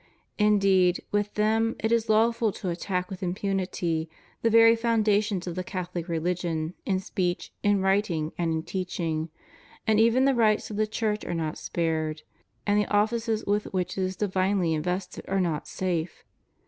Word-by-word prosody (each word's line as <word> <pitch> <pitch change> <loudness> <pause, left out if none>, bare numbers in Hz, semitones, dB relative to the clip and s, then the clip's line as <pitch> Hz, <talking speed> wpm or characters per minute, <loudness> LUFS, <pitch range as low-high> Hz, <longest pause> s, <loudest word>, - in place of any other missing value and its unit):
Indeed, 195 -4 +4
with 205 0 -1
them 220 +2 +2
it 220 - -1
is 230 -1 +1
lawful 225 0 +3
to 185 - -4
attack 180 +2 -3
with 190 - -7
impunity 180 -3 -1 0.3
the 230 - +3
very 230 0 +7
foundations 215 -4 +1
of 175 - -4
the 185 +1 -3
CathoUc 180 -2 -5
religion, 170 -1 -2
in 190 -2 +1
speech, 180 -1 -2
in 205 -1 +2
writing, 190 -5 +1
and 170 -2 -1
in 160 0 -1
teaching; 165 -4 -3 0.6
and 220 -1 +3
even 230 +4 +4
the 275 - +4
rights 220 -3 +2
of 205 - -5
the 215 0 +1
Church 215 -1 -1
are - - -3
not 160 -2 -3
spared, 155 -2 -2 0.4
and 205 0 +3
the - - -2
ofiices 220 +1 +1
with 205 +1 +1
which 180 -1 -1
it 190 - -2
is 185 0 -1
divinely 190 -3 +1
invested 180 +4 -3
are 195 0 0
not 165 -5 -1
safe. 175 -3 -3
190 Hz, 165 wpm, -27 LUFS, 175-215 Hz, 0.6 s, very